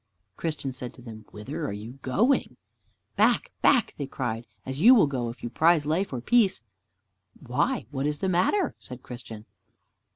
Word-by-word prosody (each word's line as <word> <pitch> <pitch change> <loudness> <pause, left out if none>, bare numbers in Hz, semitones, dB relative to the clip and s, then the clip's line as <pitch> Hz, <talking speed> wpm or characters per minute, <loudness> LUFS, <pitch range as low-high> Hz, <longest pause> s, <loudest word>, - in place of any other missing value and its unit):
Christian 155 - -3
said 125 -1 -7
to - - -14
them, 110 -3 -10
"Whither 105 0 -6
are - - -3
you 110 +6 -8
going?" 225 - +1 0.6
"Back, - - +3
back," 250 -6 +4
they 140 - -4
cried, 120 -4 -4 0.2
"as 130 +3 -5
you 245 +7 +9
will 215 - +6
go, 130 -4 -2
if 115 - -10
you 120 - -3
prize 160 +1 +3
life 165 +6 0
or 125 -3 -4
peace!" 200 - +3 0.8
"Why, - - -1
what 140 0 -1
is 150 0 -1
the 190 - -2
matter?" 185 - +2
said 125 -1 -11
Christian. 115 -3 -9
135 Hz, 170 wpm, -26 LUFS, 120-175 Hz, 0.8 s, you